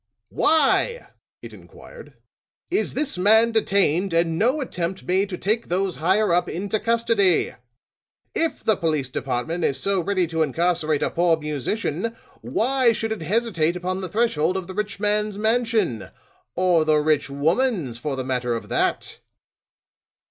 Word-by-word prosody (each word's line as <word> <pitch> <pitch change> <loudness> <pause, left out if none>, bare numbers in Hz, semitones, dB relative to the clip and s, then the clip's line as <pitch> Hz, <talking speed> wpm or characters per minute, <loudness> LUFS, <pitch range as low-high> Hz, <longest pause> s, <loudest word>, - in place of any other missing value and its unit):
"Why," 320 - +2 0.3
it - - -9
inquired, - - -14 0.6
"is 390 - 0
this 285 -11 -2
man 220 +4 +5
detained 195 -5 +1
and 165 0 +1
no 255 +7 +2
attempt 185 -8 -4
made 190 +2 0
to 180 - -5
take 220 +6 -1
those 185 +1 -1
higher 190 +3 +2
up 175 - +1
into 200 +5 -2
custody? 225 -5 +2 0.8
If 330 0 -2
the 220 - +3
Police 155 -7 -1
Department 135 +7 -3
is 135 -3 0
so 195 +2 0
ready 185 0 0
to 165 0 -2
incarcerate 160 0 0
a - - -1
poor 170 -1 +2
musician, 160 - -3 0.3
why 235 - +1
should 225 0 -3
it 220 - -3
hesitate 175 -3 0
upon 185 +1 -3
the 185 - -4
threshold 190 -5 +1
of 190 - -4
the 190 - -8
rich 210 0 -4
man's 210 0 0
mansion? 220 - 0 0.5
or 180 -3 +3
the 155 -1 +3
rich 150 -1 +1
woman's, 160 - 0
for 140 +2 -3
the 130 - -3
matter 125 -2 -1
of 115 - -7
that?" - - -1
185 Hz, 150 wpm, -23 LUFS, 160-220 Hz, 0.8 s, man